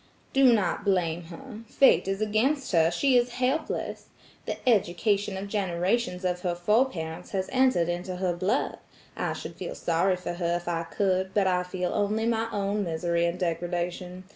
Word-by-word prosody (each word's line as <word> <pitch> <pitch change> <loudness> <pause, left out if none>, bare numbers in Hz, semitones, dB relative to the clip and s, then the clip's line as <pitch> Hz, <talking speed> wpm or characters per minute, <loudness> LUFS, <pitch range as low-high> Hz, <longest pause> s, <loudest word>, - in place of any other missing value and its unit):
"Do 270 -2 +6
not 205 -4 +1
blame 175 -4 0
her. 220 +6 -10
Fate 210 -8 +4
is 195 +1 -2
against 250 +7 +1
her. 165 -3 +4
She 260 +10 +2
is 240 0 +1
helpless. 260 +5 -2 0.4
The - - -2
education 200 -1 +2
of 195 +1 -5
generations 190 0 -1
of 180 -1 0
her 180 -2 -1
foreparents 175 -4 0
has 190 -1 -1
entered 255 -10 +3
into 175 +2 -3
her 180 -1 0
blood. 185 +4 -1 0.4
I - - -2
should - - -8
feel - - -5
sorry 175 +3 +1
for 180 -1 -5
her 175 -1 -1
if 175 0 -5
I 165 -1 -1
could, 190 +1 -1
but 200 -2 +3
I 180 -1 +2
feel 180 0 -3
only 210 +2 0
my 230 -1 +1
own 205 +1 -1
misery 170 0 0
and 170 +1 -3
degredation. 175 +1 -3
185 Hz, 170 wpm, -27 LUFS, 175-215 Hz, 0.4 s, Do